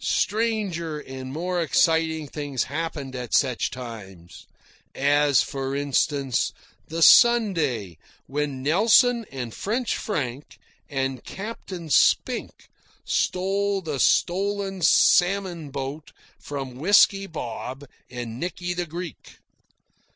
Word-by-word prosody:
Stranger 200 -8 -1
and 130 -2 -8
more 175 +4 -2
exciting 160 0 +2
things 140 -4 -3
happened 145 -3 -5
at 125 -3 -2
such 130 -4 +1
times. 100 -9 -10 0.5
As, 145 -2 +3
for 135 0 -4
instance, 140 -2 0 0.3
the 165 +1 0
Sunday 160 - +4 0.3
when 140 -2 -3
Nelson 225 - +4
and 125 -4 -6
French 235 +4 -2
Frank 145 - -4 0.3
and 135 -3 -2
Captain 190 -6 -7
Spink - - +2 0.4
stole 195 +2 0
the 150 -4 -4
stolen 195 +3 +1
salmon 175 -1 +3
boat 140 +2 -6 0.3
from 135 -3 -6
Whisky 195 +4 +4
Bob 135 -2 -6 0.2
and 120 -1 -6
Nicky 180 +1 -3
the 175 0 -3
Greek. 170 0 -8
150 Hz, 100 wpm, -24 LUFS, 135-185 Hz, 0.5 s, Sunday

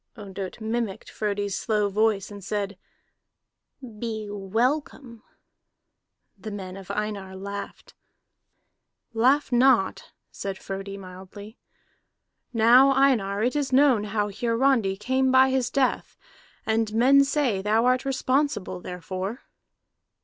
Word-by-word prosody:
Ondott 195 -2 -7
mimicked 220 -2 -3
Frodi's 205 -1 -2
slow 210 -2 0
voice, 210 0 0
and 200 -1 -10
said: 200 0 -3 1.2
"Be 220 -2 -4
welcome." 235 +4 -2 1.2
The 215 - -7
men 190 -3 -7
of 195 -1 -11
Einar 200 -2 -4
laughed. 200 +1 -8 1.2
"Laugh 260 +6 +2
not," 245 -5 +2 0.2
said 195 -1 -5
Frodi 195 +1 -6
mildly. 190 +3 -11 0.9
"Now, 240 +4 +6
Einar, 220 -7 +2
it 250 +4 0
is 285 -3 -1
known 260 -5 +4
how 210 0 -1
Hiarandi 230 -2 +1
came 260 +5 +1
by 260 0 +5
his 260 -2 0
death, 270 -2 -1 0.5
and 220 -1 0
men 270 +4 +6
say 275 -8 0
thou 215 +4 +2
art 255 +1 +2
responsible 265 -8 -1
therefor." 185 - -6
220 Hz, 110 wpm, -25 LUFS, 200-255 Hz, 1.2 s, Now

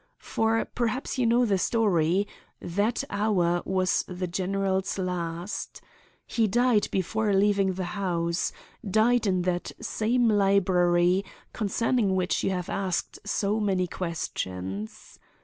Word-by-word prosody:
For—perhaps 225 +3 -1
you 245 - +3
know 240 +2 +4
the 200 -4 +1
story—that 200 - 0
hour 185 -5 +1
was 185 -1 +1
the 180 0 -4
general's 190 +2 -1
last. 175 0 -4 0.5
He 225 -2 +1
died 240 +1 +3
before 205 +2 0
leaving 195 -1 +3
the 185 +1 -3
house; 170 -4 -1 0.3
died 220 +3 +2
in 185 -2 +1
that 175 -1 -1
same 230 +2 +1
dark 210 -1 +3
library 180 -2 +3 0.3
concerning 220 -1 +1
which 180 -1 0
you - - +1
have 180 -2 -2
asked 190 -3 -2
so 205 +1 0
many 190 -3 +1
questions. 105 - -5
195 Hz, 115 wpm, -27 LUFS, 180-215 Hz, 0.5 s, know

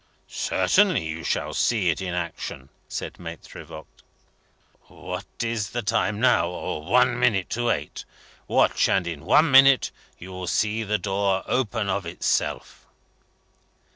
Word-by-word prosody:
"Certainly 200 - +2
you 80 +1 -5
shall - - -2
see 105 -8 +2
it 80 - -5
in 90 -2 -3
action," 75 -6 -5 0.2
said - - -6
Maitre - - -9
Voigt. 80 - -13 0.9
"What - - -7 0.2
is 115 -3 -2
the 120 -1 -4
time 105 -1 0
now? 120 -7 +3 0.3
One 120 +9 +2
minute 110 -7 +1
to 120 +1 0
eight. - - -3 0.4
Watch, - - +2
and 95 -2 +2
in 80 -2 -6
one 150 - +4
minute 135 -1 +6 0.3
you 95 +2 -10
will 90 0 -6
see 110 +4 0
the 105 -1 0
door 100 -1 -1
open 110 -4 -1
of 100 -2 -2
itself." 85 - -2
105 Hz, 140 wpm, -24 LUFS, 90-120 Hz, 0.9 s, minute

